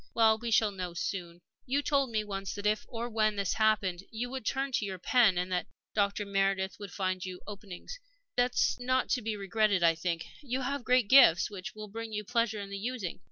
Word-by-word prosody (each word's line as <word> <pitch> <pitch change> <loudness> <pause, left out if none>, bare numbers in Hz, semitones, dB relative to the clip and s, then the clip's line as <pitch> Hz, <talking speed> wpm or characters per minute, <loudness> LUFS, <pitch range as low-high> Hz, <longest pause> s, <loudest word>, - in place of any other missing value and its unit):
Well, 220 -1 +5
we 235 +1 -3
shall 220 -1 +3
know 180 -3 -5
soon. 175 -1 -4 0.3
"You 280 +3 +1
told 275 -3 +2
me 215 -2 0
once 195 -2 -5
that 205 0 -6
if, 210 0 +1
or 235 0 -4
when, 215 -2 +1
this 200 -3 0
happened, 205 -5 +2
you 245 +2 -4
would 265 -5 -5
turn 270 +1 -1
to 240 - 0
your 195 -2 -4
pen, 215 0 +4
and 180 +1 -1
that 180 -1 -1 0.3
Dr. 205 0 +1
Meredith 195 -1 0
would 200 -2 -7
find 185 -2 -2
you 185 -1 -6
openings. 205 - -8 0.4
That 245 0 +2
is - - +2
not 255 +1 +1
to 250 - +1
be 220 -1 -2
regretted, 200 -1 +1
I 165 -1 +6
think. 165 0 -3 0.2
You 260 -2 -2
have 275 +1 -2
great 250 -3 +3
gifts, 205 -9 +7
which 195 0 -7
will 215 0 -7
bring 225 +2 -7
you 210 0 -2
pleasure 230 -1 0
in 200 -1 -7
the 200 - -4
using. 225 -5 -4
210 Hz, 220 wpm, -30 LUFS, 190-235 Hz, 0.4 s, gifts